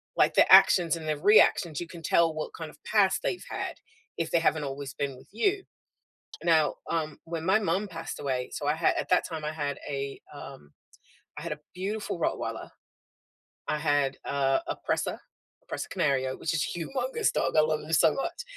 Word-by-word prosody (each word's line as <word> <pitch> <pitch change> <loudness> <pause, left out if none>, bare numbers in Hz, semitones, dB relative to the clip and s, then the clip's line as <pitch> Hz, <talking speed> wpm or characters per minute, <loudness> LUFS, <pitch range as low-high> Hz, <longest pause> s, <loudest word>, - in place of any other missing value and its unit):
like, - - +3
the - - +5
actions 175 -2 +7
and 160 -1 -7
their 155 -1 0
reactions. 175 -4 +4
You 175 - -5
can 170 0 -10
tell 165 +1 +3
what 155 0 -5
kind 160 -1 -7
of - - -19
past 200 -3 +2
they've 360 - -2
had - - -4 0.4
if 165 -1 -2
they 170 - +4
haven't 160 -2 +1
always 140 -1 -5
been 140 -3 -3
with - - -17
you. 385 - 0 0.8
Now, 160 -3 +3 0.2
um, 155 -3 -2
when 165 -1 -5
my 190 +4 +4
mom 195 +1 -1
passed 165 -2 -7
away, 130 -3 -2
so 145 - -4
I 150 - +2
had 160 +1 +2
at - - -3
that 180 - +3
time, 160 -3 -6
I 150 - -1
had 145 -3 -3
a, 140 -1 -4
um 75 0 -11 0.7
I - - -6
had 170 -1 -4
a 150 - -4 0.2
beautiful 195 0 -4
Rottweiler - - -2 1.0
I 150 - 0
had, 145 -3 +1
uh, 135 -1 +1
a - - -3
Presa, - - 0 0.5
a - - -7
Presa - - -4
Canario- 130 -2 0
which 160 - -2
is 155 - +1
humongous 425 - -1
dog, - - 0
I - - +7
love 155 0 +1
him 155 - -8
so 160 0 +5
much- 275 - -3
160 Hz, 195 wpm, -28 LUFS, 145-175 Hz, 1.0 s, actions